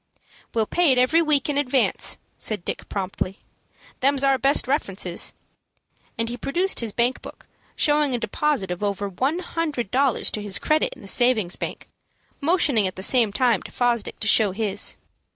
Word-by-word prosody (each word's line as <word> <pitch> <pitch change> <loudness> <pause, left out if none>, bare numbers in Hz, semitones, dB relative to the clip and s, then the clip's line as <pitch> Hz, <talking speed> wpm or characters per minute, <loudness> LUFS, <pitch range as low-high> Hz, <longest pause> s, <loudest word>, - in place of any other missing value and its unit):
"We'll 225 -1 +2
pay 345 +4 +3
it 255 - +3
every 255 +7 +4
week 300 -4 +2
in 290 -1 0
advance," 265 -2 +1 0.2
said 210 -5 -2
Dick, - - -5
promptly. 190 -1 -3 0.6
"Them's 275 +1 +2
our 270 -1 +3
best 275 0 +2
references," 195 - -1 0.8
and 230 - -1
he 240 +1 -4
produced 350 +10 0
his 230 -2 -1
bank 240 +4 +1
book, - - -12 0.3
showing 295 -3 +2
a - - 0
deposit 240 -5 -1
of 180 - -4
over 200 0 -1
one 260 - -1
hundred 315 - -3
dollars 265 -1 +2
to 210 - -3
his 205 -2 -2
credit 310 0 0
in - - -15
the - - -10
savings 220 -5 +2
bank, - - -6 0.5
motioning 285 - +2
at 185 - -6
the 190 - -7
same 230 -2 +3
time 235 -2 +2
to - - -11
Fosdick 240 -3 -1
to 215 - -1
show 205 -2 +4
his. 205 -1 -1
245 Hz, 175 wpm, -23 LUFS, 205-280 Hz, 0.8 s, every